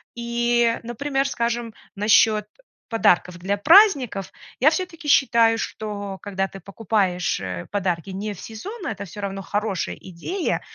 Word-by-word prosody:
И, 235 Hz, 0 st, +1 dB
э, -, -, -11 dB
например, 270 Hz, +4 st, -1 dB
скажем, 235 Hz, -2 st, -2 dB, 0.2 s
насчёт, 210 Hz, +1 st, +4 dB
э, -, -, -24 dB, 0.3 s
подарков 180 Hz, -6 st, +2 dB
для 195 Hz, +3 st, -1 dB
праздников. 280 Hz, -, +5 dB, 0.3 s
Я 280 Hz, -, +6 dB
всё-таки 335 Hz, -2 st, -4 dB
считаю, 235 Hz, -5 st, +4 dB
что 205 Hz, -3 st, -5 dB
когда 195 Hz, -1 st, -2 dB
ты 195 Hz, -, -11 dB
покупаешь, 195 Hz, -2 st, -1 dB
э, 90 Hz, -2 st, -5 dB
подарки 185 Hz, -3 st, -1 dB
не 205 Hz, +3 st, -4 dB
в 195 Hz, -, -13 dB
сезон, 380 Hz, -, -8 dB
это 200 Hz, -2 st, -4 dB
всё 205 Hz, +3 st, -9 dB
равно 195 Hz, -1 st, -4 dB
хорошая 205 Hz, -2 st, -2 dB
идея. 205 Hz, -, -3 dB
215 Hz, 145 wpm, -23 LUFS, 195-240 Hz, 0.3 s, Я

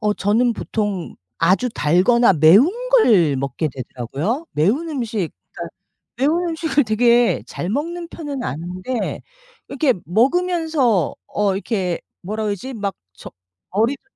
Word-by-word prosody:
어. 210 Hz, -1 st, +1 dB
저는 225 Hz, +5 st, +2 dB
보통 205 Hz, -5 st, -3 dB, 0.2 s
아주 190 Hz, +9 st, +2 dB
달거나 195 Hz, +7 st, +3 dB
매운 170 Hz, -, +6 dB, 0.2 s
걸 205 Hz, -, +4 dB
먹게 140 Hz, +4 st, -2 dB
되더라고요. 135 Hz, -, -4 dB
매운 220 Hz, -, +1 dB
음식 230 Hz, -, -2 dB, 0.2 s
그러니까 -, -, -8 dB, 0.4 s
매운 330 Hz, +6 st, +1 dB
음식을 320 Hz, -3 st, +1 dB
되게 235 Hz, +2 st, +3 dB
잘 175 Hz, -, -5 dB
먹는 335 Hz, +7 st, -3 dB
편은 290 Hz, -6 st, -6 dB
아닌데 180 Hz, -, -4 dB, 0.5 s
이렇게 275 Hz, -2 st, +1 dB
먹으면서 275 Hz, -, +1 dB
어 205 Hz, -2 st, 0 dB
이렇게 190 Hz, -3 st, -2 dB, 0.2 s
뭐라 215 Hz, +4 st, -3 dB
그러지? 210 Hz, +6 st, -4 dB
막 200 Hz, -3 st, -3 dB, 0.2 s
저 -, -, -11 dB, 0.4 s
머리도 225 Hz, +8 st, 0 dB
220 Hz, 270 characters per minute, -20 LUFS, 185-275 Hz, 0.5 s, 매운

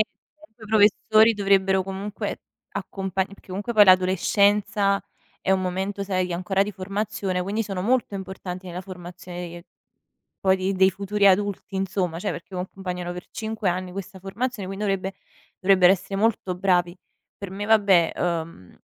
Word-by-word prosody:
i 275 Hz, +3 st, -6 dB
professori 215 Hz, +1 st, +5 dB
dovrebbero, 195 Hz, -1 st, +3 dB
comunque, 195 Hz, +2 st, -5 dB, 0.3 s
accompag 190 Hz, -1 st, -3 dB
perché, 200 Hz, -1 st, -17 dB
comunque, 200 Hz, +5 st, -4 dB
poi, 210 Hz, -1 st, +8 dB
l'adolescenza 200 Hz, +2 st, +3 dB, 0.4 s
è -, -, 0 dB
un 190 Hz, 0 st, +3 dB
momento, 190 Hz, +2 st, -2 dB
sai, 185 Hz, -2 st, -1 dB
ancora 190 Hz, +3 st, +1 dB
di 210 Hz, -, -4 dB
formazione, 195 Hz, -1 st, -2 dB
quindi 205 Hz, +4 st, -1 dB
sono 195 Hz, -4 st, -4 dB
molto 240 Hz, -1 st, +1 dB
importanti 190 Hz, -1 st, -6 dB
nella 180 Hz, 0 st, -5 dB
formazione 180 Hz, -1 st, -8 dB
che 170 Hz, 0 st, -10 dB, 0.8 s
poi 190 Hz, 0 st, +3 dB
di 190 Hz, +1 st, -1 dB
dei 190 Hz, 0 st, +5 dB
futuri 200 Hz, +2 st, -1 dB
adulti, 200 Hz, 0 st, +2 dB
insomma, 185 Hz, -3 st, -1 dB
cioè, 205 Hz, -, -2 dB
perché 195 Hz, -, -9 dB
accompagnano 180 Hz, -1 st, -5 dB
per 180 Hz, -, -9 dB
5 220 Hz, -3 st, -2 dB
anni 180 Hz, +1 st, -3 dB
questa 190 Hz, 0 st, -7 dB
formazione, 205 Hz, +2 st, -4 dB
quindi 195 Hz, +2 st, -5 dB
dovrebbe 195 Hz, -1 st, -1 dB, 0.5 s
dovrebbero 190 Hz, -1 st, +6 dB
essere 195 Hz, +1 st, -5 dB
molto 205 Hz, -3 st, +1 dB
bravi. 180 Hz, -1 st, +1 dB, 0.4 s
Per 200 Hz, -, -7 dB
me, 195 Hz, +2 st, -5 dB
vabbè, 200 Hz, -6 st, +4 dB
uhm, 165 Hz, -, -3 dB
190 Hz, 150 wpm, -24 LUFS, 185-205 Hz, 0.8 s, poi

